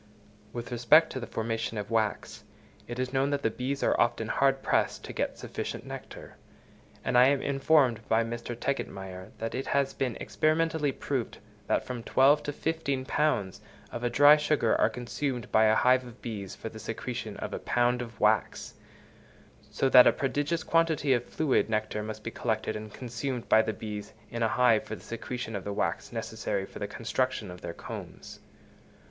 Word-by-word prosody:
With 120 0 -6
respect 125 +7 +5
to 130 - -4
the 120 - -6
formation 115 0 -3
of 105 +2 -5
wax, 110 -2 -1 0.4
it 120 - -6
is 130 +1 -2
known 135 +1 +2
that 140 -6 -1
bees 135 +2 -2
are - - +3
often 115 -1 +1
hard 135 0 +2
pressed - - +1
to - - -7
get - - -2
sufficient - - -5
nectar; - - -9 0.7
and - - 0
I 125 +1 +8
am 140 0 +3
informed 135 -4 +3
by 110 +1 +4
Mr. 120 +1 -5
Tegetmeier 95 -8 -4
that 115 0 -4
it 130 - -3
has 140 -1 +1
been 130 -4 -2
experimentally 155 -2 +1
proved 130 -2 -3 0.3
that - - +1
from 125 -2 -5
twelve 135 +5 +4
to - - 0
fifteen 140 -4 -2
pounds 105 -10 0 0.3
of 120 0 -2
dry 145 +4 +8
sugar 150 0 +2
are - - +5
consumed 125 0 -4
by 110 - +5
a 110 0 +5
hive 130 +2 +4
of 120 -1 -12
bees 105 -5 -6
for - - -7
the - - -10
secretion - - -5
of - - -5
a - - -3
pound 120 0 +1
of 115 -3 -8
wax; 105 -2 +1 1.0
so 135 - 0
that 125 -1 +8
a - - +7
prodigious 145 +3 -1
quantity 160 -4 +2
of 120 -1 0
fluid 150 -7 +1
nectar 110 -1 -1
must 110 0 -6
be 115 - -4
collected 110 -2 -2
and 110 0 -7
consumed 125 +2 -4
by 110 - +6
the 110 0 -1
bees 105 -1 -7 0.2
in 115 - -4
a 115 - +4
hive 120 -2 +4
for 110 - -6
the - - -14
secretion 115 0 -5
of 100 - -4
the 100 - -4
wax 100 - -2
necessary 110 -4 -3
for - - -11
the 105 - -3
construction 120 0 -2
of 90 0 -11
their 85 - -5
combs. - - -9
120 Hz, 185 wpm, -29 LUFS, 110-135 Hz, 1.0 s, I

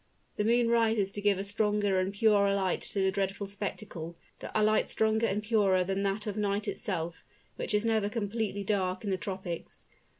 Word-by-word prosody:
The 210 - +1
moon 235 +2 +3
rises 225 -4 +2
to 205 - -6
give 205 -2 +3
a 195 - -2
stronger 205 -1 +1
and 185 +1 0
purer 200 -1 +3
light 190 -2 0
to 200 - -2
the 190 0 +3
dreadful 195 0 -2
spectacle, 195 -4 -6 0.2
a 215 - 0
light 215 0 +3
stronger 220 +1 +2
and 210 +2 -1
purer 205 -4 +3
than 195 +2 -1
that 200 +1 -1
of 210 -2 -3
night 205 -1 -1
itself, 170 -4 -3 0.3
which - - -2
is 210 +2 +1
never 220 -2 +2
completely 210 -2 -2
dark 190 -2 -1
in 205 - -2
the 190 - +1
tropics. 185 -3 -6
200 Hz, 190 wpm, -30 LUFS, 195-215 Hz, 0.3 s, moon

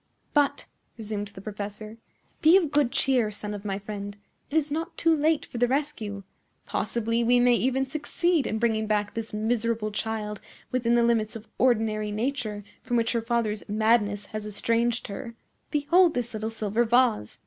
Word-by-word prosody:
"But," 290 -1 +2 0.3
resumed 210 -2 -4
the 200 -1 -12
professor, 210 +1 -6 0.4
"be 325 +4 +7
of 330 -7 0
good 290 -5 +2
cheer, 250 -5 +2
son 210 0 -5
of 205 -1 -6
my 195 -2 -2
friend. 205 0 -6 0.3
It 310 - 0
is 300 -2 +1
not 325 +4 -3
yet - - -40
too 330 -1 +3
late 310 +1 +2
for 240 - -7
the 245 - +4
rescue. 240 -7 -2 0.4
Possibly 230 0 -1
we 245 +1 +4
may 245 0 +5
even 260 +2 +1
succeed 310 +3 0
in 220 - -1
bringing 220 -1 +1
back 210 -1 0
this 225 -1 -4
miserable 220 0 -1
child 210 -1 -3 0.3
within 240 -2 +2
the 235 - +4
limits 230 -2 +1
of 225 -1 -9
ordinary 220 -4 +2
nature, 215 -2 -2 0.2
from 240 - -1
which 230 -1 +1
her 235 - 0
father's 230 -2 -1
madness 210 -1 +2
has 215 0 -4
estranged 230 +3 0
her. 230 +3 -7 0.3
Behold 330 +4 +4
this 240 -1 -2
little 215 0 -3
silver 225 +1 0
vase! 235 - +2
230 Hz, 175 wpm, -26 LUFS, 210-255 Hz, 0.4 s, be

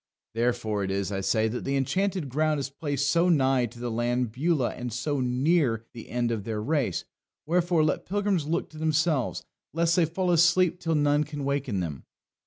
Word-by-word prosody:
Therefore 115 -3 0
it 95 - -2
is, 100 +1 -1
I 95 -1 -2
say, 110 +3 +2
that 120 +3 -4
the 135 - -1
Enchanted 185 +4 0
Ground 155 +3 +1
is 140 0 -4
placed 145 -1 -2
so 170 +4 +3
nigh 135 -6 +3
to 120 +1 -14
the 120 -1 -3
land 120 +1 0
Beulah 140 +1 0
and 125 -1 -6
so 135 +5 -2
near 125 -2 +1
the 115 - -10
end 120 0 0
of 110 -3 -2
their 110 0 -3
race; 130 - -1 0.4
wherefore 170 0 +2
let 155 - -1
pilgrims 195 -5 0
look 170 +2 -1
to 155 - -11
themselves 155 -3 0 0.3
lest 170 0 +2
they 175 - +4
fall 180 +3 -1
asleep 175 +1 +4
till 165 -2 -1
none 145 0 +3
can 145 -1 -6
waken 135 -8 -1
them." 75 -7 -5
140 Hz, 195 wpm, -27 LUFS, 120-165 Hz, 0.4 s, they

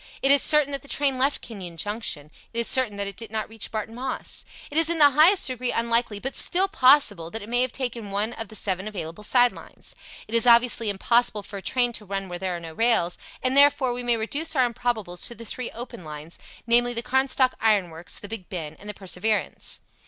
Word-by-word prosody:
It 270 - +5
is 280 - +7
certain 300 -2 +5
that 275 - -3
the - - -14
train 275 -2 0
left 275 +3 +1
Kenyon 185 -7 -9
Junction. 170 -6 -3 0.2
It 235 - -9
is 235 - +2
certain 245 -6 +2
that 200 - -2
it 200 -1 -6
did 225 +1 -8
not 215 0 -3
reach 225 -2 -7
Barton 220 0 -5
Moss. 255 +2 -4 0.3
It 295 - -3
is 325 0 +4
in 340 - +1
the 290 -2 +6
highest 325 +8 +4
degree 255 -1 -1
unlikely, 230 -2 0
but 265 +5 -5
still 375 +2 +3
possible, 255 - +3
that 225 +3 -6
it - - -10
may 245 +1 +1
have 255 -1 0
taken 240 -5 -5
one 205 +4 -2
of 225 -2 -6
the 215 - -11
seven 190 -1 -1
available 185 -2 -7
side 245 +2 +4
lines. - - -11 0.3
It 215 - -11
is 230 +1 +4
obviously 235 -2 +5
impossible 215 +1 +1
for 200 - -8
a - - -7
train 245 +5 0
to 215 - -6
run 195 -1 -4
where 175 0 -6
there 185 -1 -3
are - - -5
no 165 -1 -9
rails, 220 -4 +1 0.2
and, 255 +1 +1
therefore, 280 -3 +5
we 245 - -4
may 240 -1 +1
reduce 295 +9 -1
our 260 -2 +4
improbables 220 -6 -2
to 235 - -8
the 230 - -10
three 250 +2 -5
open 235 -5 -9
lines, 155 +1 -9 0.3
namely 240 +1 +3
the 235 - -3
Carnstock 260 0 +1
Iron 205 -6 +2
Works, 165 +2 -7
the 205 - -8
Big 215 -4 -6
Ben, 160 -4 -6
and 205 - -9
the 210 - -5
Perseverance. 195 +3 -2
230 Hz, 235 wpm, -24 LUFS, 200-255 Hz, 0.3 s, is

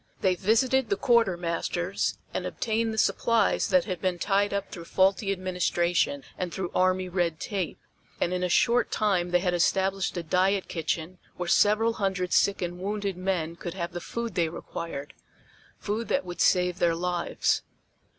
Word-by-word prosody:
They 190 -2 +3
visited 230 +6 +2
the 200 - +2
quartermasters 180 -5 0 0.2
and - - -2
obtained 225 0 -1
the 220 - -5
supplies 230 +1 +2
that 275 -2 +3
had 185 -4 -4
been 185 -2 0
tied 200 +2 +1
up 200 0 -3
through 170 -2 -8
faulty 195 +3 +2
administration 175 -5 0 0.2
and 180 -1 -2
through 185 -1 -4
army 185 0 +2
red 175 -3 -1
tape, 195 -5 -3 0.4
and 175 - 0
in 180 - -1
a 180 - 0
short 240 +6 +3
time 190 -5 +1
they 180 0 +2
had 180 -1 0
established 190 +2 +1
a 175 - -2
diet 185 +4 +1
kitchen 165 +2 -3 0.2
where 180 - -3
several 215 +5 +4
hundred 190 -2 0
sick 200 -2 +3
and 175 0 -4
wounded 200 0 -2
men 180 -3 -2
could 175 +1 -6
have 170 -2 -3
the 175 - -5
food 235 +4 -4
they 170 -2 +1
required, 160 -3 -6 0.6
food 215 +3 -3
that 280 - 0
would 175 0 -5
save 180 -1 +3
their 170 -1 +3
lives. 175 0 0
185 Hz, 170 wpm, -27 LUFS, 175-200 Hz, 0.6 s, several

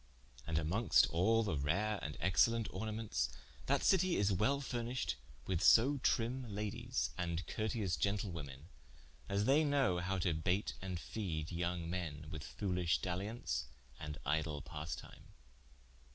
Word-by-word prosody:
And 80 - 0
amonges 90 +6 +4
all 110 +7 +3
the 100 -7 -1
rare 95 +9 0
and 75 -1 -5
excellent 115 +4 +3
ornamentes, 105 - -2 0.4
that - - +2
Citie 185 -1 +4
is 100 0 +2
wel 130 +10 +2
furnished 125 -2 -2 0.3
with 90 -4 0
so 135 +5 +6
trimme 125 -1 0
Ladies 100 - -2
and 85 -1 -1
curteous 110 -5 -1
gentlewomen, 85 -9 -2 0.6
as 100 +1 +1
they 145 +5 +5
know 140 - +2
how 95 +2 -1
to 85 -2 +1
baite 90 +6 0
and 95 -2 -4
feede 85 -7 -4
yong 85 0 -2
men 80 -4 -4
with 80 -2 -5
foolish 90 -4 0
daliaunce, 90 - -2 0.3
and 75 -1 -5
idle 75 0 0
passetime. 80 -2 -7
95 Hz, 135 wpm, -36 LUFS, 80-110 Hz, 0.6 s, so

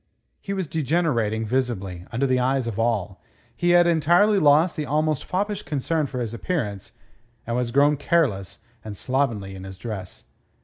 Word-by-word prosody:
He 195 - -6
was 190 -2 -1
degenerating 135 -8 0
visibly, 100 -7 -2
under 120 +4 0
the 130 -1 +2
eyes 130 0 +1
of 115 -2 -4
all. 105 -5 -1 0.3
He 175 - 0
had 175 - +5
entirely 175 +5 +4
lost 155 +2 +4
the 150 - -3
almost 155 0 0
foppish 205 +2 -2
concern 150 +2 -1
for 125 -2 -4
his 115 -1 -4
appearance, 115 - -3 0.5
and 115 - -2
was 125 -1 0
grown 145 +4 +3
careless 135 - 0 0.2
and 105 -2 -7
slovenly 115 -7 -1
in 95 -1 -9
his 95 -1 -9
dress. 100 -4 -7
130 Hz, 165 wpm, -24 LUFS, 110-155 Hz, 0.5 s, had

